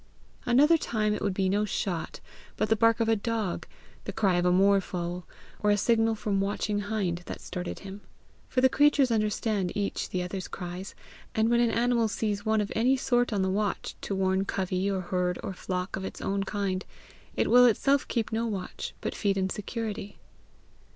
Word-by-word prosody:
Another 295 +7 +5
time 215 -6 0
it - - -3
would 200 -2 -1
be 190 -1 +1
no 205 +3 +2
shot, 185 -5 -3 0.4
but 215 - 0
the 220 - +4
bark 230 +1 +3
of 225 - +2
a 225 - +4
dog, 220 -3 -2 0.4
the - - -3
cry 200 -4 +2
of 175 - +1
a - - +4
moorfowl, 180 -2 +1 0.3
or 210 - +1
a 205 - +4
signal 225 +1 +2
from 200 -2 -1
watching 205 +1 -1
hind 200 -4 -1
that - - -6
started 180 -1 -6
him; 195 +1 -8 0.5
for 255 - +1
the 260 - +7
creatures 285 -1 +4
understand 215 -3 0
each 200 -1 -2
the 180 -1 -1
other's 185 +1 -5
cries, 180 +1 -7 0.4
and 220 +1 +3
when 235 - +4
an 240 -1 +3
animal 235 0 +2
sees 205 -1 -2
one 220 0 +2
of 205 - -3
any 255 +4 +3
sort 245 -1 +1
on 200 -3 +1
the - - +1
watch 205 +1 -1
to 200 - -3
warn 190 0 +1
covey 190 0 -1
or 190 -1 -1
herd 180 0 -1
or - - -4
flock 180 0 -3
of 195 - -5
its - - -6
own 195 0 -1
kind, 195 -2 -2 0.5
it - - +1
will 245 0 +8
itself 275 +5 +2
keep 230 -2 -1
no 225 +1 0
watch, 195 -4 -5
but - - -3
feed 200 -2 0
in 190 -1 0
security. 210 -1 -5
205 Hz, 195 wpm, -28 LUFS, 190-225 Hz, 0.5 s, will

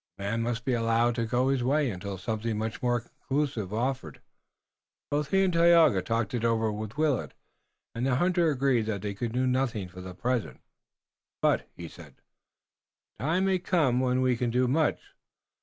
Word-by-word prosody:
The 100 - -7
man 110 +3 -1
must 115 0 -2
be 130 - +1
allowed 115 +1 +2
to 115 -1 -2
go 125 +3 +1
his 135 -2 +1
way 140 0 +2
until 95 +1 -6
something 110 +3 -3
much 110 +1 -4
more 120 -1 +1
conclusive 130 -4 -3
offered. 115 - -3 0.9
Both 145 0 0
he 195 +2 +3
and 185 -2 +1
Tayoga 165 - +5
talked 115 +4 -2
it 120 -2 -2
over 115 -1 +1
with 105 +4 -6
Willet, 150 -5 0 0.6
and 120 +3 -1
the 130 - +2
hunter 175 +2 +2
agreed 130 -5 +1
that 100 -3 -3
they 105 -1 -3
could 115 +3 -4
do 125 +2 0
nothing 125 -7 -1
for 90 +1 -10
the 90 -1 -8
present. 120 +3 -2 0.8
"But," - - +1
he 85 - -7
said, 80 -5 -14 1.0
"the - - -4
time 175 +5 +2
may 190 -1 +2
come 155 -9 +1
when 130 0 +1
we 130 -1 +2
can 120 0 -1
do 125 +2 +2
much." 150 +5 0
120 Hz, 185 wpm, -28 LUFS, 110-135 Hz, 1.0 s, Tayoga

